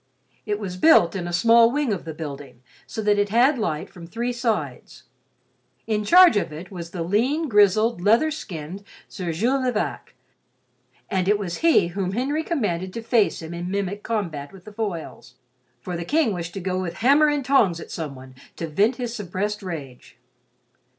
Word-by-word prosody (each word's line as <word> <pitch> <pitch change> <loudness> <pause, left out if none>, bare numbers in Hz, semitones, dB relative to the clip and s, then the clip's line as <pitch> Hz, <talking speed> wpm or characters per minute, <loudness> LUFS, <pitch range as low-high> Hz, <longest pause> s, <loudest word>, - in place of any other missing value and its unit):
It 210 -1 0
was 185 -4 -5
built 185 - +5
in 175 -2 -3
a - - -4
small 230 +6 +5
wing 285 -5 0
of 185 - -5
the 160 - -5
building 140 -5 -8 0.2
so 220 - -5
that 205 0 +3
it 205 0 +1
had 245 +5 +3
light 160 -8 -2
from 170 -2 -12
three 235 +6 -3
sides. 235 -3 -3 0.8
In 215 -1 -1
charge 355 - +7
of 180 - -1
it 165 +5 -9
was 170 -3 -7
the 170 -1 -4
lean, 250 - 0
grizzled, 210 -1 +3
leather 230 - +3
skinned 185 - -7 0.2
Sir 180 -4 -5
Jules 245 +11 0
de 255 - +1
Vac, 215 - -4 0.9
and 185 -1 -1
it 210 +1 +4
was 185 -4 -4
he 325 - +3
whom 190 +1 -3
Henry 275 +7 -1
commanded 190 - -2
to 230 - -6
face 225 -6 +1
him 160 +1 -7
in 175 +1 -5
mimic 200 +1 -3
combat 170 -12 -3
with 190 -2 -15
the 215 - -11
foils, 170 - -6 0.5
for 180 +7 -5
the 170 - -4
King 285 - +1
wished 170 0 -6
to - - -3
go 185 0 -2
with 170 -2 -4
hammer 290 +3 +6
and 295 -3 0
tongs 210 -11 +3
at - - -10
someone 135 -5 -7 0.2
to 165 - -4
vent 205 - +2
his 245 -2 -4
suppressed 205 +1 -3
rage. 145 -9 -8
200 Hz, 185 wpm, -23 LUFS, 170-230 Hz, 0.9 s, charge